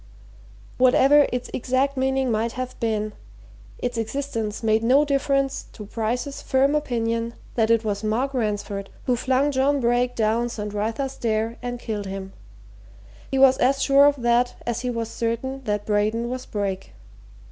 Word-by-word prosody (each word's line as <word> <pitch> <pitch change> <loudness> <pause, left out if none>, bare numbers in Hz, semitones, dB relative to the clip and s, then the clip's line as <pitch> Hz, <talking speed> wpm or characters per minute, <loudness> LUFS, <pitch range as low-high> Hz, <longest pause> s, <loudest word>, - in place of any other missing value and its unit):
Whatever 270 +3 +6
its 250 0 -3
exact 260 +3 0
meaning 265 -1 +1
might 225 +2 0
have 255 0 -4
been, 215 -2 -1 0.6
its 245 -2 -3
existence 225 -2 -3
made 220 0 +3
no 270 +5 +4
difference 275 -1 0
to 210 - -9
Bryce's 240 +6 -3
firm 270 +2 +2
opinion 230 -5 -1 0.2
that 225 -2 +1
it 230 -1 +3
was 205 0 -2
Mark 240 +6 0
Ransford 205 -4 -2 0.2
who 250 - +2
flung 260 +4 +1
John 280 +1 +2
Brake 245 0 +1
down 230 +2 +1
St. 210 -3 -5
Wrytha's 225 +6 -2
Stair 225 -2 -1
and 245 0 -4
killed 210 -4 -4
him. 190 0 -6 1.0
He 270 - -1
was 265 -1 +6
as 270 +2 +3
sure 280 +1 +6
of 285 -4 0
that 240 +1 +2
as 240 0 -2
he 250 - -2
was 230 -2 -2
certain 235 +4 -3
that 210 -1 -1
Braden 215 +3 0
was 255 0 -5
Brake. 195 -2 -3
240 Hz, 160 wpm, -24 LUFS, 220-265 Hz, 1.0 s, Whatever